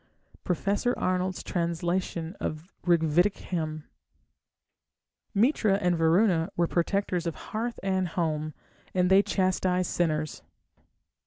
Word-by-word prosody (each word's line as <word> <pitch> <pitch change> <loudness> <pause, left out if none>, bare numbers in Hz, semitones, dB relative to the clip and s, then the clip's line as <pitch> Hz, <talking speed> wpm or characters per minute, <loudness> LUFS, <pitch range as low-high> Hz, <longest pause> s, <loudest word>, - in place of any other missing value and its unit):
Prof. 200 +6 0
Arnold's 185 0 -1
trans. 170 -1 -2
of 170 -1 -3
Rigvedic 170 +3 +3
Hymn. 155 -3 -4 1.5
Mitra 220 -2 +3
and 180 -3 +1
Varuna 165 +1 +3
were 170 - +3
protectors 180 0 0
of 165 - -2
hearth 230 +2 -4
and 190 -1 +1
home, 155 -3 -2 0.4
and 180 0 +3
they 195 +1 +8
chastised 185 -2 0
sinners. 155 -3 -1
180 Hz, 100 wpm, -28 LUFS, 165-190 Hz, 1.5 s, they